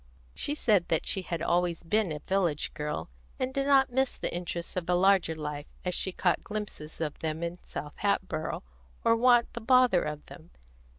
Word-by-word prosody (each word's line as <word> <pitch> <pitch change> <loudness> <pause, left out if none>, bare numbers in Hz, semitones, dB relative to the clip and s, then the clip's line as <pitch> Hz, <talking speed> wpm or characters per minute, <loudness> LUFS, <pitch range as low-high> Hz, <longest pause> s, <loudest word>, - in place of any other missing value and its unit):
She 290 - -3
said 205 - +3
that 160 - +1
she 190 - 0
had 170 -2 -4
always 175 -1 +1
been 210 +1 +1
a 150 - -2
village 175 -2 0
girl, 150 - -4 0.3
and 255 0 -2
did 275 0 0
not 270 -2 +5
miss 265 +1 +1
the - - -3
interests 175 -1 -4
of 180 -1 -3
a 180 - +4
larger 185 -3 +4
life, 150 -1 -5 0.2
as 180 - 0
she 190 - 0
caught 180 -1 +1
glimpses 205 -7 -6
of 155 -3 -3
them 160 +1 -3
in 170 +1 -4
South 150 0 -7
Hatboro', 185 -6 -1 0.4
or 230 - +5
want 240 0 +4
the 235 - -5
bother 250 -5 +5
of 150 0 -4
them. 170 0 -13
180 Hz, 190 wpm, -29 LUFS, 160-220 Hz, 0.4 s, not